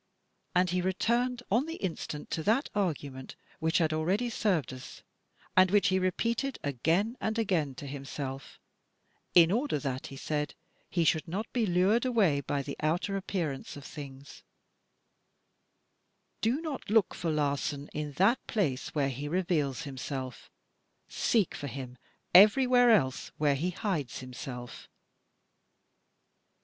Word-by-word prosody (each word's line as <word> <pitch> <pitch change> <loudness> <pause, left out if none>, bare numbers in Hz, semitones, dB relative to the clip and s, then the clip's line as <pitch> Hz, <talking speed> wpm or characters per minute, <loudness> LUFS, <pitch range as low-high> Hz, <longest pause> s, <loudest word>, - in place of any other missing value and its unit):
And 180 -1 +3
he 180 0 +1
returned 235 +7 0
on 245 +9 +3
the 325 - -4
instant 160 - -5
to 160 - -1
that 225 - +2
argument 145 -9 -3 0.2
which 160 -1 +2
had 160 -3 +2
already 190 +10 0
served 180 - 0
us 130 - -10 0.5
and 185 0 +6
which 205 +1 +4
he 190 0 +2
repeated 230 +8 0
again 165 - +1
and 220 +1 -1
again 170 - 0
to 145 - -8
himself 135 -1 -6 0.8
(in 170 -1 +8
order 245 - +1
that, 135 -2 -3
he 135 - -9
said, 150 +1 -2 0.3
he 170 - +1
shoidd 160 0 +2
not 195 +7 -4
be 235 -4 +1
lured 190 +6 +3
away 210 - +3
by 140 +1 -2
the 140 - -5
outer 170 +6 0
appearance 170 -9 -3
of 140 - -10
things): 140 -2 -10 1.1
" - - -47
Do 245 +7 +1
not 310 -9 -5
look 215 -3 +3
for 165 - -3
Larsan 145 -1 -1
in 150 -1 -4
that 195 - +2
place 155 - -1
where 140 -2 +2
he 140 +3 -5
reveals 165 -4 0
himself; 130 -2 -6 0.6
seek 215 -7 +1
for 145 - -5
him 130 -1 -7 0.3
everywhere 245 +6 +7
else 135 - +2
where 150 -2 +3
he 155 +6 -1
hides 180 - -2
him 130 -1 -8
self." 125 -1 -8
165 Hz, 140 wpm, -30 LUFS, 140-210 Hz, 1.1 s, in